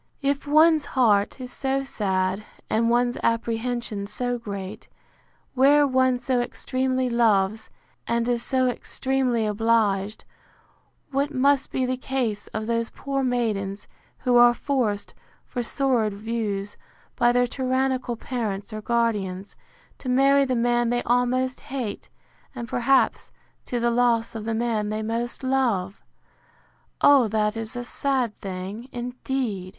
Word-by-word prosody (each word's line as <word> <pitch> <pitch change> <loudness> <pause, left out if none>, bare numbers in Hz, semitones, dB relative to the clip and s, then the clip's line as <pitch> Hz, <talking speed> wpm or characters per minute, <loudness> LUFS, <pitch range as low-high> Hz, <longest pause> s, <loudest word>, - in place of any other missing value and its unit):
—If 280 +1 0
one's 310 0 +5
heart 210 -2 +3
is 250 -1 -8
so 270 0 -1
sad, 190 -5 -1 0.3
and 230 +1 +2
one's 240 +1 +1
apprehension 230 -2 -1
so 245 +3 -2
great, 200 -4 -7 0.7
where 285 +3 +5
one 260 -1 +2
so 245 0 0
extremely 255 +1 -1
loves, 220 -3 +2 0.4
and 235 0 0
is 240 -1 0
so 260 +1 +1
extremely 250 -2 0
obliged; 210 -2 +1 0.9
what 280 +2 0
must 275 0 +2
be 260 - 0
the 255 0 -1
case 250 -6 -2
of 215 0 -4
those 230 0 -1
poor 275 0 -3
maidens, 210 -6 -1 0.4
who 245 -1 +4
are 240 0 +7
forced, 235 -9 -1 0.3
for 245 - -4
sordid 235 -5 0
views, 210 -2 -3 0.4
by 240 - +4
their 245 0 +3
tyrannical 255 -1 -1
parents 220 -4 -4
or 215 - -5
guardians, 205 -5 -1 0.4
to 255 - -5
marry 275 +2 +4
the 260 -1 0
man 240 0 +2
they 240 0 0
almost 250 +2 +1
hate, 255 -6 -4 0.5
and, 235 -2 -5
perhaps, 245 +4 +2 0.4
to 245 - -2
the 235 0 +1
loss 235 -1 +2
of 220 -2 -6
the 225 0 -1
man 220 -2 -1
they 215 +1 -2
most 230 +3 -3
love! 235 -8 0 1.0
O 275 -5 +6
that 210 0 0
is 225 0 -6
a 245 - -3
sad 255 -3 -1
thing, 195 +6 -6
indeed! 245 -5 -3
240 Hz, 135 wpm, -24 LUFS, 215-260 Hz, 1.0 s, are